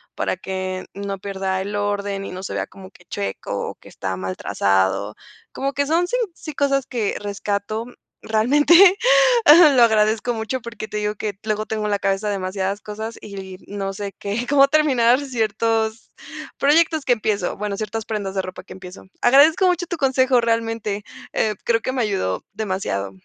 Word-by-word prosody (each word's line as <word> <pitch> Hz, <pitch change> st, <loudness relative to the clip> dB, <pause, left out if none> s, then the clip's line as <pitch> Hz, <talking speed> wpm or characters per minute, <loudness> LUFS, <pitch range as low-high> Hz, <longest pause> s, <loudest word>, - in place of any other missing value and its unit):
para -, -, -1 dB
que 185 Hz, 0 st, -4 dB
no 200 Hz, -1 st, -4 dB
pierda 190 Hz, -1 st, -2 dB
el 205 Hz, +2 st, -4 dB
orden 205 Hz, -1 st, -2 dB
y -, -, -6 dB
no 185 Hz, -, -7 dB
se -, -, -5 dB
vea -, -, -1 dB
como 190 Hz, -1 st, -13 dB
que 180 Hz, -, -21 dB
checo, 100 Hz, -, -4 dB
o -, -, -8 dB
que -, -, -19 dB
está 95 Hz, -1 st, -4 dB
mal 95 Hz, 0 st, -4 dB
trazado. 100 Hz, +1 st, 0 dB, 0.4 s
Como 275 Hz, +1 st, -2 dB
que 285 Hz, 0 st, 0 dB
son 340 Hz, +3 st, +2 dB
sí, -, -, -1 dB, 0.2 s
sí, 310 Hz, -, -8 dB
cosas 275 Hz, -1 st, +1 dB
que 230 Hz, -5 st, -2 dB
rescato, 205 Hz, +2 st, -3 dB, 0.4 s
realmente. 295 Hz, -, +5 dB, 0.8 s
Lo 245 Hz, -, +7 dB
agradezco 220 Hz, +1 st, +2 dB
mucho 225 Hz, +3 st, -3 dB
porque 220 Hz, -2 st, -7 dB
te 210 Hz, -, -5 dB
digo 210 Hz, 0 st, -1 dB
que 205 Hz, -1 st, -4 dB
luego 215 Hz, 0 st, -1 dB
tengo 215 Hz, -1 st, -2 dB
en 210 Hz, -, -1 dB
la 205 Hz, -, +1 dB
cabeza 195 Hz, +1 st, 0 dB
demasiadas 195 Hz, 0 st, -2 dB
cosas 220 Hz, +2 st, -6 dB
y 190 Hz, -2 st, -8 dB
no 195 Hz, -1 st, -4 dB
sé, 200 Hz, 0 st, -6 dB
qué 215 Hz, +5 st, -3 dB
cómo 275 Hz, -1 st, +6 dB
terminar 270 Hz, -5 st, +3 dB
ciertos, 225 Hz, -3 st, -1 dB, 0.5 s
proyectos 310 Hz, +1 st, +3 dB
que 250 Hz, -, +4 dB
empiezo. 210 Hz, -6 st, -1 dB
Bueno, 205 Hz, -1 st, -3 dB
ciertas 220 Hz, +1 st, -4 dB
prendas 205 Hz, -3 st, -3 dB
de 190 Hz, -, +1 dB
ropa 185 Hz, 0 st, -8 dB
que -, -, -11 dB
empiezo. 185 Hz, 0 st, -11 dB, 0.2 s
Agradezco 295 Hz, +9 st, +5 dB
mucho 355 Hz, -1 st, +1 dB
tu 345 Hz, -, -4 dB
consejo, 260 Hz, -2 st, +3 dB
realmente. 225 Hz, -3 st, -1 dB, 0.3 s
Eh, 215 Hz, -, +1 dB
creo 230 Hz, -1 st, +2 dB
que -, -, -2 dB
me 255 Hz, -, 0 dB
ayudó 190 Hz, -, -1 dB
demasiado. 185 Hz, -, -3 dB
215 Hz, 180 wpm, -21 LUFS, 195-245 Hz, 0.8 s, Lo